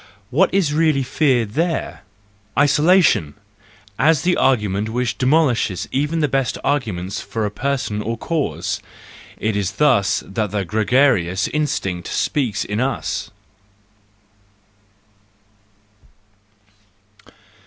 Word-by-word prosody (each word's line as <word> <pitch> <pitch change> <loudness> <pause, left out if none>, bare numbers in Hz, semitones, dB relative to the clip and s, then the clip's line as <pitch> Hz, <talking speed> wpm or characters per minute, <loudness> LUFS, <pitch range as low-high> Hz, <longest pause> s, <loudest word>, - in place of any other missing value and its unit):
What 180 +8 +3
is 180 -6 +1
really 155 -3 +2
feared 125 -5 +1
there? 165 +2 -2 0.6
Isolation 150 - +3
l - - -32 0.7
as 160 -4 +2
the 180 0 +2
argument 105 -5 +1
which 120 0 -1
demolishes 130 - +1
even 150 +5 0
the 150 - +2
best 135 -3 -1
arguments 105 -9 -2
for 110 -2 -3
a 105 - -2
person 125 -4 -2
or 115 +2 -3
cause!—It 100 - -4
is 100 -1 -1
thus 100 -7 +2
that 105 +1 -2
the 100 -1 -2
gregarious 105 -3 +2
instinct 95 - -2
speaks 120 -9 -1
in 105 +1 -3
us. 130 +2 -2
125 Hz, 100 wpm, -20 LUFS, 100-145 Hz, 0.7 s, What